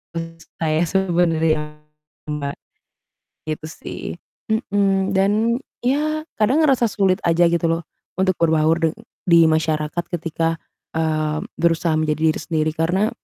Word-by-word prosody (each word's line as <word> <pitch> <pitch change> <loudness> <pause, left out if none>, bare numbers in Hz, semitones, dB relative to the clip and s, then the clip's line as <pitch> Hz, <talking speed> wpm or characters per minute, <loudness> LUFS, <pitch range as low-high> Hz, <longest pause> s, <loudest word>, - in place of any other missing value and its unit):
menurut 165 0 -6 0.2
saya 155 0 +1
sih 190 - +2
sebenernya 160 -3 +1 0.5
Mbak, 145 -1 -3 0.9
gitu 155 0 -3
sih. - - -8 0.5
Mhm, 200 -3 +1
dan 195 +1 +3 0.5
ya 305 +5 0
kadang 235 +8 +3
ngerasa 265 -5 +4
sulit 195 -2 +2
aja 170 +1 +4
gitu 170 0 0
loh 165 +1 0 0.4
untuk 190 0 +2
berbaur 160 -1 +3
deng - - -13 0.3
di 170 -2 +6
masyarakat 155 +1 0
ketika, 165 0 -1 0.4
eee, 155 -1 0 0.2
berusaha 165 -1 +1
menjadi 155 -1 0
diri - - -5
sendiri 155 -1 0
karena 185 +7 +1
165 Hz, 125 wpm, -21 LUFS, 155-195 Hz, 0.9 s, di